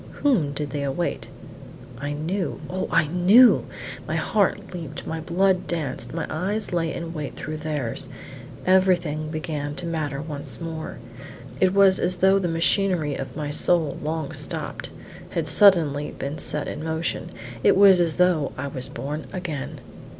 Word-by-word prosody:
Whom 215 - +3
did 145 -1 -3
they 145 - -3
await? 140 +5 -2 0.7
I 145 +2 -3
knew! 170 +5 -2
Oh, 185 +1 -2
I - - +4
knew! 185 - +6 0.4
My - - -2
heart 200 -2 0
leaped, 160 -5 -7
my 160 - -3
blood 180 +3 +1
danced, 155 -6 -2
my 165 - -3
eyes 200 +5 -1
lay 165 -2 0
in 170 0 -5
wait 150 -3 -6
with 155 0 -5
theirs. 145 -7 -2 0.6
Everything 175 -5 +2
began 155 -2 -4
to 180 - -2
matter 155 -4 -2
once 145 -1 -6
more. 165 -2 -6 0.6
It 185 0 +3
was 195 -1 +6
as 180 +1 +1
though 190 +2 +4
the 185 - -1
machinery 165 -1 +1
of 135 -1 -6
my 150 -1 -3
soul, 160 -1 +2
long 155 -1 -3
stopped, - - -3 0.4
had 165 -2 -2
suddenly 155 -4 +4
been 140 +3 -4
set 150 - -2
in 155 - -5
motion; 160 +1 -2 0.3
it - - +5
was 195 -2 +8
as 170 -3 +2
though 180 -5 +2
I 140 - -3
was 130 -1 -2
born 145 +2 -5
again. 170 -7 -5
160 Hz, 155 wpm, -24 LUFS, 150-180 Hz, 0.7 s, was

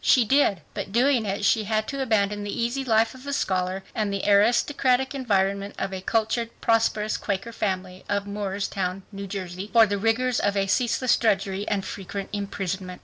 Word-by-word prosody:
She 250 -3 +5
did. 220 - +3
But 200 -2 -5
doing 240 0 +3
it 200 +1 -1
she 215 0 +3
had 215 +1 0
to 275 0 -3
abandon 205 -4 +1
the 205 - -5
easy 240 +4 -1
life 225 -2 +2
of 260 +2 -13
a 280 - -2
scholar 185 -5 -1
and 210 -2 -1
the 200 -1 -2
aristocratic 250 +5 +3
environment 200 -6 0
of 195 - -3
a 190 - -4
cultured, 225 +3 0
prosperous, 225 -2 +1
Quaker 200 +3 -3
family, 185 -3 -3
of 200 0 0
Moorestown, 195 -2 -3
New 200 -1 -6
Jersey, 190 0 -5
for 230 -1 +7
the 205 -1 -2
rigors 230 +3 +1
of 205 0 0
a 195 - +2
ceaseless 245 +4 +2
drudgery 200 -2 0
and 200 -2 -1
frequent 195 0 -6
imprisonment. 190 -2 -4
205 Hz, 180 wpm, -25 LUFS, 195-230 Hz, -, for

